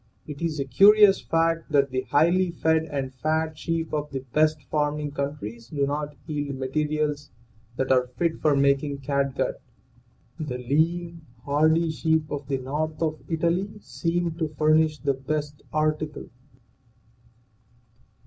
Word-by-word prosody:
It 150 Hz, 0 st, -8 dB
is 160 Hz, -3 st, -2 dB
a 140 Hz, -, -1 dB
curious 200 Hz, -, +6 dB
fact 165 Hz, 0 st, 0 dB
that 140 Hz, -2 st, +3 dB
the 130 Hz, 0 st, 0 dB
highly 175 Hz, +7 st, +2 dB
fed 160 Hz, -1 st, +1 dB
and 135 Hz, -4 st, -4 dB
fat 155 Hz, +4 st, -1 dB
sheep 165 Hz, +1 st, -3 dB
of 150 Hz, -1 st, -2 dB
the 135 Hz, -2 st, -4 dB
best 155 Hz, -1 st, +2 dB
farming 150 Hz, +1 st, -1 dB
countries 140 Hz, -6 st, -5 dB
do 140 Hz, +1 st, -1 dB
not 145 Hz, +1 st, -3 dB
yield 145 Hz, -3 st, -3 dB
materials 150 Hz, +2 st, -1 dB, 0.5 s
that 130 Hz, +1 st, -1 dB
are 125 Hz, -1 st, +3 dB
fit 165 Hz, +2 st, 0 dB
for 150 Hz, -2 st, +3 dB
making 140 Hz, 0 st, +1 dB
catgut. 140 Hz, 0 st, -1 dB, 0.8 s
The 145 Hz, -5 st, -3 dB
lean, 165 Hz, +6 st, 0 dB, 0.2 s
hardy 160 Hz, +3 st, +3 dB
sheep 160 Hz, 0 st, 0 dB
of 145 Hz, -2 st, -4 dB
the 135 Hz, -1 st, 0 dB
north 150 Hz, +4 st, -3 dB
of 155 Hz, -1 st, -1 dB
Italy 170 Hz, +5 st, -1 dB
seem 170 Hz, -3 st, -2 dB
to 160 Hz, -, +1 dB
furnish 155 Hz, 0 st, +3 dB
the 140 Hz, -2 st, 0 dB
best 145 Hz, +2 st, -4 dB
article. 155 Hz, -1 st, -1 dB
150 Hz, 140 wpm, -25 LUFS, 140-160 Hz, 0.8 s, curious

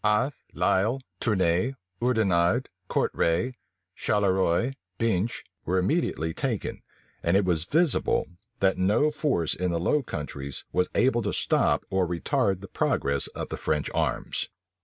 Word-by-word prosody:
Athe, 105 Hz, +7 st, +2 dB, 0.2 s
Lisle, 110 Hz, +8 st, +2 dB, 0.2 s
Tournay, 95 Hz, +3 st, +1 dB, 0.3 s
Oudenarde, 110 Hz, -2 st, +2 dB, 0.2 s
Courtray, 90 Hz, +11 st, +1 dB, 0.4 s
Charleroi, 95 Hz, +3 st, +1 dB, 0.3 s
Binche, 115 Hz, 0 st, 0 dB, 0.2 s
were 90 Hz, +2 st, 0 dB
immediately 90 Hz, -, 0 dB
taken: -, -, -2 dB, 0.4 s
and 85 Hz, +3 st, +3 dB
it 100 Hz, -, +2 dB
was 85 Hz, -3 st, +1 dB
visible, 160 Hz, -, +2 dB, 0.4 s
that 95 Hz, -1 st, +3 dB
no 105 Hz, +11 st, +3 dB
force 140 Hz, -, 0 dB
in 90 Hz, 0 st, -1 dB
the 85 Hz, -1 st, 0 dB
Low 145 Hz, -, +2 dB
Countries 70 Hz, -, -6 dB
was 90 Hz, 0 st, +1 dB
able 120 Hz, -2 st, +3 dB
to 100 Hz, -, -1 dB
stop -, -, +2 dB
or 95 Hz, -2 st, +2 dB
retard 95 Hz, -, 0 dB
the 100 Hz, -, -8 dB
progress 70 Hz, -6 st, 0 dB
of -, -, -4 dB
the -, -, -4 dB
French 75 Hz, -1 st, -1 dB
arms. -, -, -1 dB
95 Hz, 135 wpm, -27 LUFS, 85-120 Hz, 0.4 s, and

